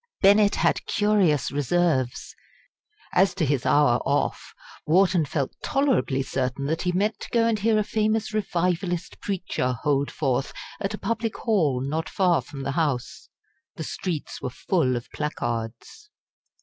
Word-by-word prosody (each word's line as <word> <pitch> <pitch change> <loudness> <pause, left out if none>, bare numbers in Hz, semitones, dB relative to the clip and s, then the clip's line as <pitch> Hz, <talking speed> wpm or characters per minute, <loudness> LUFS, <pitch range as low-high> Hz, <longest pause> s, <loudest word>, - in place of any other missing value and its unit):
Bennett 205 +1 +6
had - - +1
curious 200 - +2
reserves. 140 -2 0 0.8
As 190 +2 +3
to 160 - +1
his 140 -2 0
hour 145 -5 +4
off, 140 +1 -1 0.3
Wharton 180 0 +4
felt 140 -2 -2
tolerably 260 - +1
certain 130 +1 -2
that 160 +3 -1
he 180 - 0
meant 205 +5 0
to - - -8
go 230 -1 +2
and 225 -2 +1
hear 220 +1 +2
a 215 - +2
famous 215 +1 0
Revivalist 180 -3 -1
preacher 180 -10 -2
hold 140 -1 +1
forth 135 -2 -1 0.3
at 200 +2 -2
a - - -10
public 225 +2 -2
hall 160 - +1
not 160 +2 -2
far 180 -6 +2
from 135 +2 -9
the 135 - -2
House. 140 -5 -2 0.5
The 160 - -5
streets 165 -1 -4
were - - -2
full 130 0 0
of 120 - -5
placards. 120 - -4
165 Hz, 150 wpm, -25 LUFS, 135-200 Hz, 0.8 s, Bennett